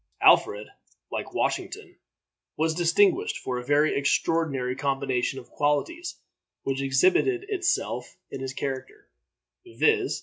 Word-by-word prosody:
Alfred, 105 +1 +5 0.5
like - - -4
Washington, - - -2 0.6
was 160 +1 +1
distinguished 205 - +2
for 125 -1 -3
a - - -7
very 145 +4 +2
extraordinary 140 -2 0
combination 135 -2 -1
of 125 - -11
qualities 235 - -1 0.5
which 135 0 -2
exhibited 185 - +2
itself 370 -4 -1
in - - -5
his 135 0 -4
character, 140 - -5 0.6
viz. 390 +2 +1
145 Hz, 110 wpm, -26 LUFS, -, 0.6 s, Alfred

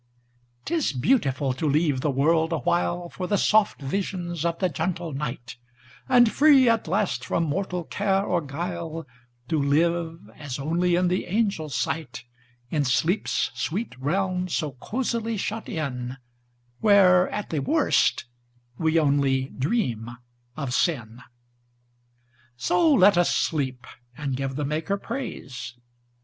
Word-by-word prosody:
'T 335 - -3
is 320 - +1
beautiful 135 - +1
to 140 +5 -2
leave 145 -2 +1
the 150 - 0
world 160 +4 +2
awhileFor 175 +2 -1
the 205 - +2
soft 215 +1 +3
visions 175 +1 -3
of 170 0 0
the 185 - +1
gentle 170 +1 -3
night; 130 -3 -5 0.5
And 245 -3 +6
free, 280 -4 +6
at 230 -4 +2
last, 195 +3 0
from 170 - 0
mortal 180 +3 -2
care 195 +3 0
or 175 -4 0
guile, 165 +2 -5 0.4
To 155 -3 +1
live 165 +3 +1 0.2
as 145 -4 -6
only 170 +5 +1
in 180 +1 +2
the 180 +1 0
angels' 190 - -1
sight, 130 +2 -3 0.5
In 150 -2 +1
sleep's 160 +9 +1
sweet 205 +8 -3
realm 185 +5 -1
so 155 -4 -2
cosily 230 - -3
shut 215 +3 -4
in, 130 -5 -4 0.6
Where, 190 -4 +5
at 210 - -5
the 155 - 0
worst, 135 - +2 0.5
we 160 0 +2
only 140 -3 +2
dream 130 - -1 0.5
of 140 -5 -3
sin! 120 -7 -1 1.4
So 170 +5 +3
let 185 +3 +6
us 175 - +3
sleep, 135 -6 -1 0.3
and 140 -3 -2
give 135 0 -3
the 145 0 -2
Maker 160 +7 -1
praise. 130 - -6
165 Hz, 135 wpm, -25 LUFS, 140-185 Hz, 1.4 s, And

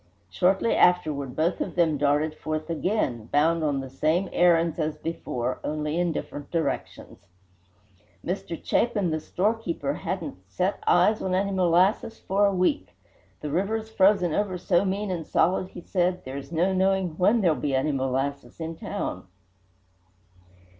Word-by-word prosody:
Shortly 195 +5 +2
afterward 155 -7 +2
both 165 +3 0
of - - -3
them 165 -3 +3
darted 145 +2 +1
forth 155 +1 -4
again, 160 - -1
bound 160 +3 +2
on 145 -3 0
the 135 - -8
same 160 +7 0
errands 170 -2 +3
as 155 -1 -1
before, 130 -6 -3
only 150 +2 -2
in 175 -1 +1
different 145 -2 -6
directions. 165 -2 -3 1.1
Mr. 175 -2 -4
Chapin, 205 -7 +1
the 155 - -1
storekeeper, 180 -5 -1
hadn't 170 - -4
"set 185 - -2
eyes 215 0 +4
on 185 -1 0
any 200 +1 0
molasses 185 +4 +2
for 200 +2 +1
a - - +2
week. 185 +11 0 0.5
The 150 - -4
river's 215 +6 -1
frozen 190 -5 +3
over 195 0 -1
so 175 0 +2
mean 195 +1 -2
and 170 -3 -3
solid," 185 +1 +2
he 180 - -10
said, 180 0 -1
"there's 135 +2 -7
no 175 +3 +1
knowing 190 0 +2
when 215 +5 +4
there'll 170 -5 +3
be 140 -2 -1
any 135 +3 +1
molasses 135 0 -2
in 165 0 -4
town." - - -5
170 Hz, 150 wpm, -26 LUFS, 150-190 Hz, 1.1 s, eyes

